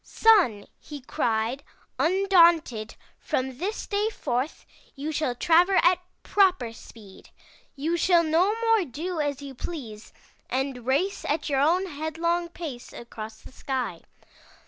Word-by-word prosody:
" -, -, -47 dB
*Sun,' 365 Hz, -, +3 dB
he 295 Hz, -1 st, -9 dB
cried, 235 Hz, +1 st, -1 dB, 0.4 s
undaunted, 335 Hz, -, +3 dB, 0.2 s
'from 260 Hz, 0 st, -3 dB
this 405 Hz, +6 st, -3 dB
day 415 Hz, +1 st, 0 dB
forth, 260 Hz, -, -3 dB, 0.3 s
you 295 Hz, +3 st, -4 dB
shall 300 Hz, -5 st, -1 dB
travel 345 Hz, +8 st, +4 dB
at 360 Hz, +1 st, +4 dB, 0.2 s
proper 370 Hz, -, +2 dB
speed. 210 Hz, -4 st, -15 dB, 0.5 s
You 320 Hz, +5 st, -1 dB
shall 345 Hz, -1 st, +4 dB
no 335 Hz, +5 st, +3 dB
more 455 Hz, -3 st, +3 dB
do 330 Hz, +4 st, -5 dB
as 285 Hz, -1 st, -3 dB
you 275 Hz, -1 st, -8 dB
please 240 Hz, -7 st, -8 dB, 0.4 s
and 260 Hz, -2 st, -3 dB
race 355 Hz, +10 st, 0 dB
at 300 Hz, +1 st, -1 dB
your 275 Hz, -2 st, +1 dB
own 350 Hz, +6 st, +3 dB
headlong 335 Hz, +2 st, -2 dB
pace 305 Hz, -8 st, -8 dB
across 220 Hz, -2 st, -9 dB
the -, -, -14 dB
sky. 255 Hz, -10 st, -4 dB
305 Hz, 135 wpm, -26 LUFS, 250-350 Hz, 0.5 s, travel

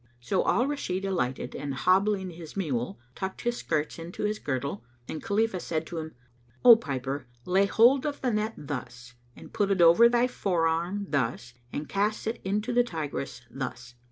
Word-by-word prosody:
So 185 Hz, +10 st, 0 dB
Al 245 Hz, -, +3 dB
Rashid 195 Hz, -10 st, -2 dB
alighted 135 Hz, -10 st, -2 dB
and 140 Hz, -2 st, -4 dB
hobbling 190 Hz, +6 st, +2 dB
his 165 Hz, +1 st, -10 dB
mule, 125 Hz, -, -2 dB
tucked 190 Hz, +5 st, -5 dB
his 240 Hz, 0 st, -1 dB
skirts 155 Hz, 0 st, -2 dB
into 170 Hz, +4 st, -6 dB
his 210 Hz, 0 st, 0 dB
girdle, 130 Hz, -5 st, -3 dB, 0.2 s
and 155 Hz, -, -5 dB
Khalifah 220 Hz, -2 st, 0 dB
said 160 Hz, -2 st, -2 dB
to 170 Hz, 0 st, -5 dB
him, 160 Hz, 0 st, -7 dB, 0.5 s
"O 240 Hz, -2 st, +12 dB
piper, 135 Hz, -, -4 dB, 0.2 s
lay 190 Hz, +2 st, +3 dB
hold 255 Hz, +7 st, +5 dB
of 290 Hz, -, -3 dB
the 250 Hz, -3 st, 0 dB
net 215 Hz, +1 st, -1 dB
thus 125 Hz, -3 st, -7 dB, 0.2 s
and -, -, -13 dB
put 205 Hz, -3 st, +1 dB
it 195 Hz, -2 st, +1 dB
over 170 Hz, +8 st, +7 dB
thy 240 Hz, 0 st, +3 dB
forearm 175 Hz, -3 st, 0 dB
thus 120 Hz, -3 st, -1 dB, 0.2 s
and 145 Hz, +1 st, -4 dB
cast 210 Hz, +2 st, 0 dB
it 225 Hz, +1 st, -3 dB
into 210 Hz, +5 st, -1 dB
the 245 Hz, 0 st, +5 dB
Tigris 150 Hz, -, -5 dB
thus." 125 Hz, -2 st, -6 dB
180 Hz, 175 wpm, -28 LUFS, 140-210 Hz, 0.5 s, O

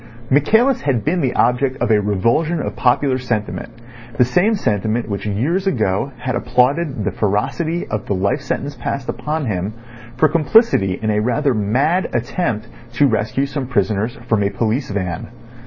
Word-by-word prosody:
Michaelis 220 Hz, -, +3 dB
had 130 Hz, -6 st, 0 dB
been 170 Hz, +4 st, +1 dB
the 130 Hz, -3 st, 0 dB
object 130 Hz, +2 st, +2 dB
of 120 Hz, -2 st, 0 dB
a 105 Hz, -1 st, +4 dB
revulsion 115 Hz, -, +1 dB
of -, -, -4 dB
popular 130 Hz, +1 st, +2 dB
sentiment, 115 Hz, -4 st, -3 dB, 0.5 s
the 125 Hz, -, +5 dB
same 180 Hz, -, +2 dB
sentiment 110 Hz, -, -1 dB
which 100 Hz, 0 st, -4 dB
years 150 Hz, -, 0 dB
ago 110 Hz, -, 0 dB
had 125 Hz, 0 st, -3 dB
applauded 125 Hz, +2 st, +1 dB
the 105 Hz, -, -1 dB
ferocity 130 Hz, -, -1 dB
of 105 Hz, -, -4 dB
the 100 Hz, -, 0 dB
life 100 Hz, +9 st, 0 dB
sentence 140 Hz, +1 st, -3 dB
passed 140 Hz, -2 st, -4 dB
upon 150 Hz, 0 st, -2 dB
him 100 Hz, -1 st, -2 dB, 0.4 s
for 155 Hz, -, +5 dB
complicity 155 Hz, -, +3 dB
in 110 Hz, -1 st, 0 dB
a 105 Hz, -, +1 dB
rather 130 Hz, +5 st, +1 dB
mad 130 Hz, -, +1 dB
attempt 120 Hz, -2 st, -1 dB, 0.3 s
to 130 Hz, +4 st, +3 dB
rescue 115 Hz, +2 st, 0 dB
some 140 Hz, -2 st, -4 dB
prisoners 110 Hz, -1 st, 0 dB
from 110 Hz, -2 st, +2 dB
a 100 Hz, -, +1 dB
police 115 Hz, +6 st, -1 dB
van. 90 Hz, -5 st, -3 dB
125 Hz, 165 wpm, -19 LUFS, 105-145 Hz, 0.5 s, the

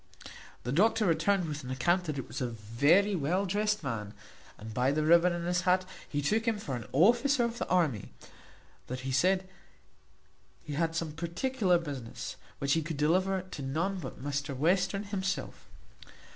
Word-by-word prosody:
The 125 Hz, -, -3 dB
doctor 215 Hz, -, +3 dB
returned 175 Hz, +2 st, +2 dB
with 150 Hz, -1 st, -5 dB
an 125 Hz, -, -7 dB
account 175 Hz, +8 st, +1 dB
that 155 Hz, -3 st, -3 dB
it 135 Hz, -, -5 dB
was 130 Hz, -, -6 dB
a 125 Hz, -, 0 dB
very 140 Hz, -, +2 dB
well 180 Hz, +5 st, 0 dB
drest 210 Hz, +1 st, 0 dB
man, 110 Hz, -6 st, -4 dB, 0.4 s
and 110 Hz, +1 st, -8 dB
by 125 Hz, +4 st, +2 dB
the 155 Hz, +1 st, 0 dB
ribbon 170 Hz, +2 st, +6 dB
in 175 Hz, 0 st, -3 dB
his 175 Hz, 0 st, +1 dB
hat 185 Hz, +1 st, +2 dB, 0.2 s
he 145 Hz, -1 st, -2 dB
took 220 Hz, -, +1 dB
him 225 Hz, -2 st, +2 dB
for 145 Hz, -11 st, -4 dB
an 120 Hz, -3 st, -6 dB
officer 240 Hz, -, +4 dB
of 235 Hz, 0 st, -2 dB
the -, -, -2 dB
army; 150 Hz, -, +1 dB, 0.8 s
that 130 Hz, +1 st, -5 dB
he 130 Hz, +1 st, -3 dB
said 185 Hz, +7 st, +2 dB, 1.2 s
he 150 Hz, -, -6 dB
had 165 Hz, +2 st, 0 dB
some 165 Hz, -2 st, -2 dB
particular 180 Hz, -, 0 dB
business, 140 Hz, -8 st, -6 dB, 0.2 s
which 140 Hz, 0 st, +1 dB
he 165 Hz, -, +2 dB
could 160 Hz, -1 st, -5 dB
deliver 185 Hz, +5 st, +2 dB
to 185 Hz, -6 st, -8 dB
none 165 Hz, +9 st, -1 dB
but 130 Hz, -7 st, -7 dB
Mr 145 Hz, -1 st, -3 dB
Western 180 Hz, +6 st, +1 dB
himself. 195 Hz, -2 st, -4 dB
165 Hz, 175 wpm, -30 LUFS, 140-190 Hz, 1.2 s, ribbon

